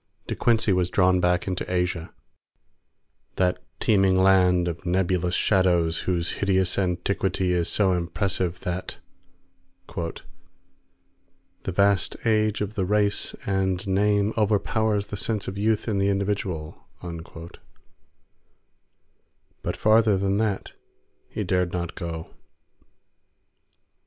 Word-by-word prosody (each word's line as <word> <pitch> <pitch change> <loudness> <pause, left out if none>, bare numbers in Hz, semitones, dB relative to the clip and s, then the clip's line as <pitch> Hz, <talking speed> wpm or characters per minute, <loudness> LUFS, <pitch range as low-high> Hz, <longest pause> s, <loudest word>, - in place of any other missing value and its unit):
De - - -3
Quincey 110 -4 +2
was 90 -1 +1
drawn 90 -1 +3
back 90 +1 +1
into 90 -1 -3
Asia, 90 -2 -1 1.2
that 90 -1 +1 0.2
teeming 95 -3 +3
land 90 -2 +4
of 85 0 -4
nebulous 90 -1 0
shadows 85 -4 +2
whose 85 -2 0
hideous 95 -1 +1
antiquity 90 0 0
is 85 -1 0
so 95 -3 +2
impressive 90 0 -1
that 90 +1 -4 0.9
"the 85 +2 -11
vast 100 0 +2
age 110 -2 +2
of 105 0 -3
the 100 - -1
race 105 +1 +1
and 95 -1 0
name 100 +2 +2
overpowers 105 0 +1
the 105 - -6
sense 105 +1 -2
of 95 - -4
youth 105 +2 0
in 105 -3 0
the 100 0 +2
individual," 95 -5 -3 2.7
but - - -3
farther 110 -2 +4
than 100 +1 0
that 105 -3 -1 0.6
he - - -3
dared 90 -2 0
not 85 -1 -3
go. 80 -2 -6
95 Hz, 110 wpm, -25 LUFS, 90-100 Hz, 2.7 s, land